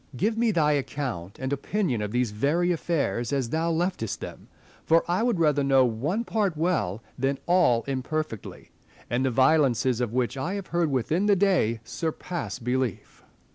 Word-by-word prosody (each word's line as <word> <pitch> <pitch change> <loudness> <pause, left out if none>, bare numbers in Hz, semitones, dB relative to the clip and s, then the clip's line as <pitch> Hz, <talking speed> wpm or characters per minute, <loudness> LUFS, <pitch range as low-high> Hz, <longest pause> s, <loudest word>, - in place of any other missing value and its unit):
Give 220 - +1
me 230 0 +2
thy 160 -7 +3
account 130 - -3
and 130 +1 -3
opinion 140 - -1
of 105 - -2
these 120 -2 0
very 150 +11 +1
affairs 150 -8 -1
as 135 -4 0
thou 160 +4 0
leftest 170 - -1
them; - - -9 0.4
for 165 +1 +4
I 175 +4 +1
would 235 -6 +1
rather 150 -3 +3
know 135 -1 +4
one 140 - -1
part 205 -8 -1
well 150 - 0 0.2
than 135 +2 0
all 170 -10 +3
imperfectly; 135 -2 -4 0.4
and 120 +2 +1
the 130 - +2
violences 130 -2 +3
of 120 -3 -1
which 125 +2 -1
I 170 +9 -2
have 200 -2 -4
heard 170 -2 +2
within 155 - 0
the 205 - +5
day 175 - +2
surpass 165 +2 -4
belief. 125 -3 -3
145 Hz, 170 wpm, -26 LUFS, 125-175 Hz, 0.4 s, the